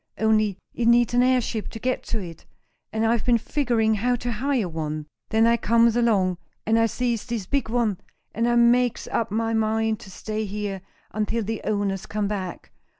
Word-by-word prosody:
Only 215 -3 +2 0.2
it 235 - -1
needs 240 0 +4
an 245 - +4
airship 250 -3 +1
to - - -8
get 255 +2 -1
to 230 - -2
it, 170 -6 -8 0.5
and 220 +1 0
I've 230 0 +2
been 240 -1 +4
figuring 230 -3 +1
how 245 +4 +1
to 245 0 -3
hire 245 -1 0
one. 155 -2 -4 0.2
Then 220 +1 +3
I 235 0 +4
comes 230 0 +3
along, 200 -7 +2 0.3
and 225 +1 +3
I 225 - +4
sees 240 -1 -2
this 235 -5 -3
big 275 +2 -1
one, 225 -5 0 0.3
and 230 +2 +1
I 240 - +2
makes 240 0 +3
up 230 -1 -1
my 225 +2 -1
mind 220 0 +1
to 210 - -12
stay 215 +3 -4
here 200 -1 -4 0.3
until 215 +2 -1
the 220 +1 -3
owners 200 -2 -1
come 210 -1 -1
back. 190 -4 -5
225 Hz, 190 wpm, -24 LUFS, 210-235 Hz, 0.5 s, needs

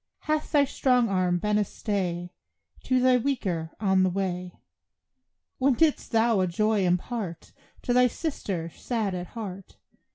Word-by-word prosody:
Hath 310 0 -1
thy 290 -2 +5
strong 250 -4 +2
arm 185 -2 +1
been 210 +3 +1
a - - +3
stay 180 -4 -3 0.5
To 255 -1 +2
the 255 0 +4
weaker 190 -11 -2
on 190 -3 +3
the 185 - +3
way? 180 -1 -3 1.0
When 270 0 +3
didst 315 +2 +1
thou 225 -2 +3
a 185 - +2
joy 210 +2 +1
impart 180 0 -3 0.3
To 245 - 0
thy 250 0 +5
sister, 200 - -4
sad 220 -6 -2
at 180 -1 -4
heart! 195 -4 -7
205 Hz, 150 wpm, -27 LUFS, 180-250 Hz, 1.0 s, thy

